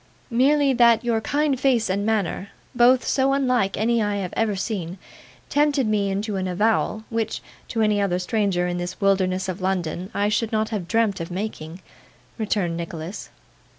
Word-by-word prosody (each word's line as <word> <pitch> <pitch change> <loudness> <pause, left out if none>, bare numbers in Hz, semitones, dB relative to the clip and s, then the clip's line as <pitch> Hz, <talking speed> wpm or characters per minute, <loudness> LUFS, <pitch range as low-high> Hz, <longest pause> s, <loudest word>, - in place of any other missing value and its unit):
'Merely 275 +3 +3
that 235 -1 +4
your 230 -2 +1
kind 290 +1 0
face 255 -4 +2
and 195 +2 -1
manner 205 -2 -1 0.2
both 250 +1 +4
so 270 0 +2
unlike 250 -8 +1
any 230 +2 +2
I 205 -1 0
have 190 -3 -4
ever 220 -2 +1
seen 190 -3 -4 0.5
tempted 290 -2 +2
me 210 -2 +1
into 200 +1 -2
an 185 0 -2
avowal, 215 +3 0
which, 225 -1 -2 0.3
to 225 -1 0
any 210 -1 +2
other 185 -3 +1
stranger 185 -1 0
in 175 0 -2
this 175 +1 -5
wilderness 190 -2 +1
of 185 +1 -4
London, 185 -1 -2
I 205 0 0
should 215 +2 0
not 215 0 0
have 200 -6 -4
dreamt 220 -2 +1
of 165 - -5
making,' 180 -3 -5 0.6
returned 205 -6 0
Nicholas. 170 +2 -6
210 Hz, 170 wpm, -23 LUFS, 185-230 Hz, 0.6 s, that